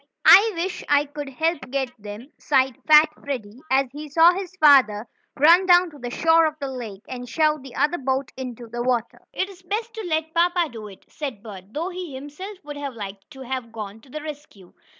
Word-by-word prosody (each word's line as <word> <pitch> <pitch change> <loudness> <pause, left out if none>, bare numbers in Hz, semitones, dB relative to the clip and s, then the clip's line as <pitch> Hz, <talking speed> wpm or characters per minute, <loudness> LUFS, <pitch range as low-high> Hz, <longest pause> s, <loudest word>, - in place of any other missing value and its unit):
"I 435 +2 +8
wish 355 +2 -3
I 290 0 +4
could 290 -1 -7
help 320 +1 -2
get 265 -1 -2
them," 210 +7 -10
sighed 265 -3 +2
fat 305 0 +7
Freddie, 245 -5 -5
as 270 +1 +3
he 300 +2 -8
saw 330 +4 +6
his 375 -1 -5
father 260 - +5 0.3
run 340 +6 +6
down 355 -1 +5
to 295 - -14
the 245 -1 -5
shore 325 +5 +4
of 310 - -4
the 275 -1 -4
lake, 225 -6 -8
and 245 -1 -7
shove 305 +3 +1
the 265 -2 -12
other 300 +5 +1
boat 265 0 -2
into 250 -2 -7
the 240 +1 -5
water. 240 -2 -1
"It's 380 -1 -4
best 435 +5 -4
to 445 -3 -6
let 315 0 -1
papa 345 -1 +2
do 220 -2 -8
it," 195 -2 -15
said 265 -9 -7
Bert, 195 -5 -10
though 330 +5 -3
he 355 -6 -7
himself 300 +10 -8
would 295 0 -8
have 280 -3 -5
liked 200 -2 -8
to 265 - -12
have 255 -2 -5
gone 215 -1 -8
to 270 - -20
the 305 +3 -7
rescue. 290 - -10
285 Hz, 210 wpm, -23 LUFS, 245-325 Hz, 0.3 s, I